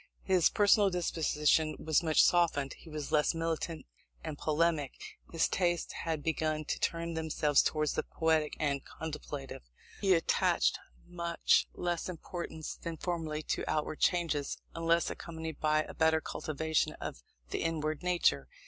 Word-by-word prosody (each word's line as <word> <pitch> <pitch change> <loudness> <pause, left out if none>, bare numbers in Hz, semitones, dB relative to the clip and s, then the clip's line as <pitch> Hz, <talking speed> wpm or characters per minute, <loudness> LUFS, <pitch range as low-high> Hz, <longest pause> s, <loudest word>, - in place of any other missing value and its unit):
His 185 -3 +4
personal 205 0 +4
disposition 160 -3 +1
was 155 -2 +2
much 160 -2 +4
softened; 160 -6 +2
he 165 - -14
was 150 -2 -5
less 150 +2 +3
militant 165 0 -2 0.4
and - - -4
polemic; 155 -2 +1 0.4
his 165 - +2
tastes 175 -2 0
had 160 -3 -3
begun 155 -1 -1
to - - -2
turn 170 0 -1
themselves 155 -3 +2
towards 155 -2 0
the - - 0
poetic 160 -2 0
and 140 -2 0
contemplative. 150 -3 -7 0.4
He 195 -2 +5
attached 165 - +2 0.3
much 170 -1 +1
less 175 0 -2
importance 170 -2 -6
than 165 -1 -5
formerly 160 -3 -3
to - - -3
outward 155 0 -1
changes; 165 -5 +1 0.2
unless 165 0 +1
accompanied 160 -2 -6
by 155 0 +2
a - - -9
better 160 0 +3
cultivation 160 0 -1
of 65 - -7 0.3
the - - -1
inward 155 -2 -1
nature. 180 -1 +2
160 Hz, 140 wpm, -32 LUFS, 155-170 Hz, 0.4 s, He